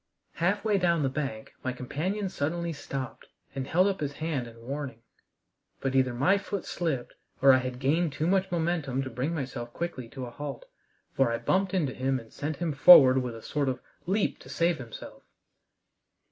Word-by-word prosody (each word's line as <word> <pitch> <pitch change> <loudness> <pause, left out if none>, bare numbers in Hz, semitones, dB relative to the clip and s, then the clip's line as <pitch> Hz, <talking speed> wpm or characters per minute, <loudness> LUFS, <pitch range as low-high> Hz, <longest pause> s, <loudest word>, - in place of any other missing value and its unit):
Halfway 200 +5 +1
down 170 -4 +2
the 135 - +2
bank 130 -6 -4
my 130 - -1
companion 175 +11 -2
suddenly 170 0 -2
stopped 135 -4 -6 0.3
and 135 -1 -4
held 180 +3 +3
up 195 -1 0
his 145 -2 -2
hand 150 -6 -2
in 115 0 -13
warning; 130 -1 -6 0.8
but 135 -1 -2
either 130 -1 +3
my 185 +11 +3
foot 200 -1 -4
slipped, 155 -8 -2 0.3
or 135 0 +7
I 130 - +5
had 130 -1 -4
gained 150 +5 +1
too 150 +3 -2
much 190 +2 +2
momentum 160 -6 0
to 130 - -6
bring 130 +8 -2
myself 130 -4 -5
quickly 130 -9 -4
to 130 0 -6
a 120 - -8
halt, 140 0 -6 0.5
for 135 -3 +2
I 115 - 0
bumped 190 +7 +1
into 145 -8 +1
him 130 0 0
and 115 -1 -15
sent 150 +2 -3
him 170 -3 -1
forward 135 -3 +9
with 125 -2 -4
a 115 - -10
sort 145 -3 -1
of 130 -1 -2 0.3
leap 200 +3 0
to - - -14
save 170 -1 +1
himself. 120 -4 -9
140 Hz, 190 wpm, -28 LUFS, 130-170 Hz, 0.8 s, forward